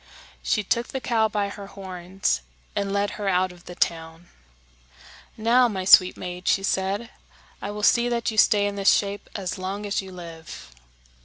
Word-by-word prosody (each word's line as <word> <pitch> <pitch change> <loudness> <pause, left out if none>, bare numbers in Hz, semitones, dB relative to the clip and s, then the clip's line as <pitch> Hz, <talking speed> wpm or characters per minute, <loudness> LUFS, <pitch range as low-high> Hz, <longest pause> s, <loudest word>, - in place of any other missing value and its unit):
She 210 - 0
took 235 +5 0
the 265 - -4
cow 225 -3 +1
by 205 -2 -1
her 200 0 -9
horns, 190 - -3 0.3
and 200 -1 -1
led 200 0 0
her 200 - 0
out 185 0 +2
of 175 -1 -17
the 175 - -9
town. 165 +1 -2 1.1
"Now, 240 +3 +4
my 190 -5 -4
sweet 185 -1 +7
maid," 180 0 -7
she 195 - +3
said, 195 +4 -1 0.5
"I - - -4
will 210 0 -6
see 240 +3 +4
that 235 -1 -1
you 215 - -7
stay 205 -2 +5
in 200 0 -3
this 195 0 +4
shape 200 0 -1
as 190 -1 -4
long 195 +3 -4
as 200 -1 -1
you 190 -1 -10
live." 165 - -10
200 Hz, 180 wpm, -24 LUFS, 185-210 Hz, 1.1 s, sweet